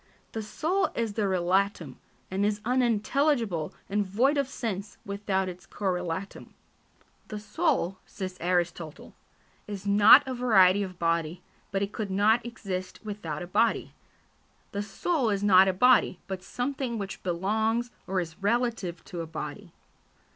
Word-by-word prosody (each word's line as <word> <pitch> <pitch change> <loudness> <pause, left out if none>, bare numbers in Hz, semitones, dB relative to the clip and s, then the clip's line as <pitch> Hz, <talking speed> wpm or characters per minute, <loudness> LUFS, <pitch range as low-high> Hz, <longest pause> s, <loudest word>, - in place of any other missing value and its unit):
The 225 - -4
soul 345 - 0
is 230 -3 -1
the 205 -1 0
relatum, 185 -5 0 0.3
and 195 +1 0
is 210 0 +1
unintelligible 240 - +1 0.2
and 205 +1 +1
void 235 +10 +2
of 280 -2 +1
sense 215 -6 -5
without 200 -1 -1
its 180 0 -8
correlatum. 185 -1 -4 0.7
"The 215 - -5
soul," 210 - 0
says 185 -1 -6
Aristotle, 175 -3 -2 0.5
"is 200 -1 -6
not 210 +7 +7
a 260 - -2
variety 205 -6 +5
of 185 -3 -5
body, 165 -1 -1 0.3
but 195 0 0
it 200 - -4
could 215 -3 -3
not 210 +4 +3
exist 190 -6 -5
without 180 -7 -5
a - - -5
body: 215 +6 +1 0.8
the 200 - -2
soul 240 - 0
is 200 -1 0
not 190 -2 +7
a - - +4
body, 230 0 +4
but 190 -1 -5
something 250 +1 -3
which 200 -2 -5
belongs 220 +7 0 0.2
or 190 0 0
is 170 +2 -6
relative 215 -5 0
to 175 -2 -5
a 165 - -6
body." 160 +4 -7
200 Hz, 145 wpm, -28 LUFS, 185-230 Hz, 0.8 s, not